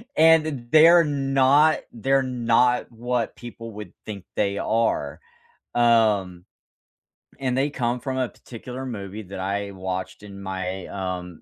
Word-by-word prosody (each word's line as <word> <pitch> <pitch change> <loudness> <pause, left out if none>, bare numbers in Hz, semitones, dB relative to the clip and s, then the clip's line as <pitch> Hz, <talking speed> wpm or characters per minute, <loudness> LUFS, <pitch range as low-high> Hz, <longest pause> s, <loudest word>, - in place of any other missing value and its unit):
and 160 0 +6
th 155 -3 -2 0.2
they're 165 +2 +7
not 140 +1 +3
they're 135 +3 +1
not 125 0 +2
what 120 0 -2
people 115 -1 -9
would 105 0 -9
think 100 -4 -7
they 100 -1 0
are, 95 -11 0 0.6
um. 105 -7 +2 0.9
And 130 -2 -1
they 140 +2 +1
come 120 -2 -1
from 130 +1 -4
a 130 -2 0
particular 125 +2 -9
movie 105 -3 -6
that 95 0 -8
I 100 +1 -2
watched 95 0 -5
in 100 -1 -10
my, 95 -1 -4
um, 90 -3 -5
115 Hz, 135 wpm, -24 LUFS, 100-130 Hz, 0.9 s, they're